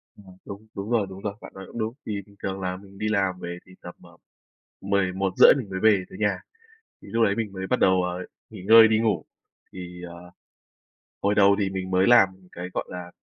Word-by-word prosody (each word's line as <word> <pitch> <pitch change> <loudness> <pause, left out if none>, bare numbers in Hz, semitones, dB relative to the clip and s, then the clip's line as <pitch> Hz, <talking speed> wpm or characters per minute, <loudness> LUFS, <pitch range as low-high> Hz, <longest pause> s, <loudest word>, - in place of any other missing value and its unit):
Ừm, 95 -2 -16
đúng, 100 +2 -10
đúng 100 +2 -5
rồi, 110 -4 +1
đúng 95 0 -10
rồi, 100 -1 -3
bạn - - -11
nói 95 - -9
cũng - - -11
đúng. 110 +1 -2
Thì 105 -2 -3
bình 100 0 -21
thường 95 0 -3
là 90 0 -3
mình 100 0 -15
đi 105 +1 -2
làm 95 -3 0
về 85 0 -6
thì 95 - -17
tầm, 90 - -10
ờ, - - -17 0.6
11:30 95 -1 +4
mình 120 -7 -6
mới 95 -1 -4
về 105 -2 +4
tới - - -11
nhà, 105 -1 0 0.6
thì - - -13
lúc 115 0 +2
đấy 100 - +2
mình 110 -2 -3
mới 95 -1 -5
bắt 125 - 0
đầu, 95 -1 +3
ờ, 90 +1 -4 0.3
nghỉ 105 -5 -10
ngơi 110 +2 +8
đi 110 0 +2
ngủ. 110 -1 0 0.5
Thì, 90 -1 -9
ờ, 85 +1 -12 0.9
hồi 100 +1 +1
đầu 100 0 +5
thì 100 -2 0
mình 95 -1 -5
mới 95 +1 +3
làm 120 -6 +6 0.2
cái, 90 +1 -7
gọi - - -2
là, 90 -1 -8
95 Hz, 225 wpm, -25 LUFS, 95-105 Hz, 0.9 s, ngơi